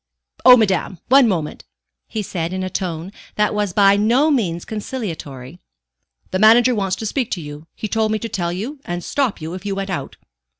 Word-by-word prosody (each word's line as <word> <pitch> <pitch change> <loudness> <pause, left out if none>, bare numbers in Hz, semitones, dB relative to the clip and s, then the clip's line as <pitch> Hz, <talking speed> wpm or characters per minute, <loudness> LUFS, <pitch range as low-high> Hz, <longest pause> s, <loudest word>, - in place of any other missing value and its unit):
"Oh, 250 -1 +9
madame, 190 -4 0
one 265 -1 +6
moment," 165 -7 -2 0.4
he 215 - -4
said 175 -2 -3
in 185 0 -3
a 185 - -4
tone 175 0 -4 0.2
that 210 0 +1
was 210 -2 -1
by 200 +1 +5
no 245 +9 +3
means 180 - 0
conciliatory. 175 - -6 0.7
"The 185 - -1
manager 235 +4 +6
wants 195 -4 -1
to 220 - -6
speak 245 +2 -1
to 180 - -3
you; 150 0 -9
he 215 - -4
told 220 0 0
me 220 - +1
to 230 - -5
tell 175 -5 -2
you, 230 +12 -5
and 175 0 -4
stop 270 -7 -1
you 160 +1 -6
if 185 0 -7
you 200 -1 -3
went 195 0 -4
out." 180 - -4
200 Hz, 200 wpm, -20 LUFS, 175-225 Hz, 0.7 s, Oh